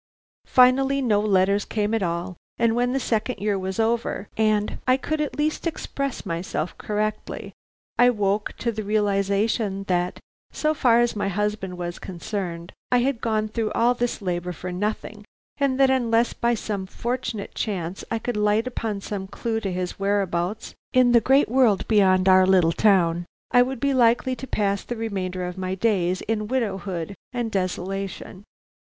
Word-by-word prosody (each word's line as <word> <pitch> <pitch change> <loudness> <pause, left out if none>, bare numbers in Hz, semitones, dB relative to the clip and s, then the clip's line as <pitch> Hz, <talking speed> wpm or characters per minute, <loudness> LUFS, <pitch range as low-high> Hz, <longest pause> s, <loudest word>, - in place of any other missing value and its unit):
Finally 265 +2 +4
no 225 -6 +2
letters 200 -1 +2
came 210 0 -1
at 225 - +1
all, 175 +1 -2 0.2
and 230 -1 +2
when 245 +1 +1
the 270 - 0
second 230 0 -1
year 205 -1 0
was 190 +2 -4
over, 225 -2 0
and 215 -1 +1
I 255 0 +5
could 310 +3 -2
at 295 - -3
least 305 +3 0
express 275 -4 -4
myself 170 -1 -3
correctly, 215 0 -3 0.5
I 245 0 +7
woke 205 -2 0
to 235 - -1
the 220 -1 -4
realization 200 0 0
that, 180 -1 -1 0.3
so 305 0 0
far 240 -5 +4
as 240 -1 +1
my 205 - -1
husband 200 -1 -2
was 175 -1 -5
concerned, 175 -2 -5 0.2
I 250 - +5
had 255 -2 0
gone 215 -2 0
through 220 -1 -2
all 240 +2 +3
this 245 -3 -2
labor 180 -1 -2
for 180 +2 -6
nothing, 210 +2 -3 0.3
and 275 -2 +1
that 270 -1 +5
unless 235 -2 +2
by 235 0 +1
some 205 -3 -4
fortunate 230 -1 -4
chance 185 -4 -3
I 230 - 0
could 225 0 -3
light 210 +2 +2
upon 225 -5 -3
some 195 -1 -5
clue 225 +3 -2
to 200 -4 -3
his 180 0 -4
whereabouts 195 0 -1 0.2
in 255 -1 +5
the 235 -1 +6
great 270 +5 +4
world 235 -5 +3
beyond 190 -3 +4
our 185 0 +6
little 180 -3 +4
town, 175 -3 +3 0.2
I 245 - +6
would 260 0 -1
be 280 +2 +1
likely 245 +1 +3
to 265 - -7
pass 200 -4 0
the 240 - -5
remainder 185 -5 -3
of 180 +1 -6
my 185 0 -2
days 185 -3 +1
in 215 -1 -2
widowhood 195 -7 -2 0.2
and 240 -2 -2
desolation. 195 +1 -4
210 Hz, 170 wpm, -24 LUFS, 190-235 Hz, 0.5 s, I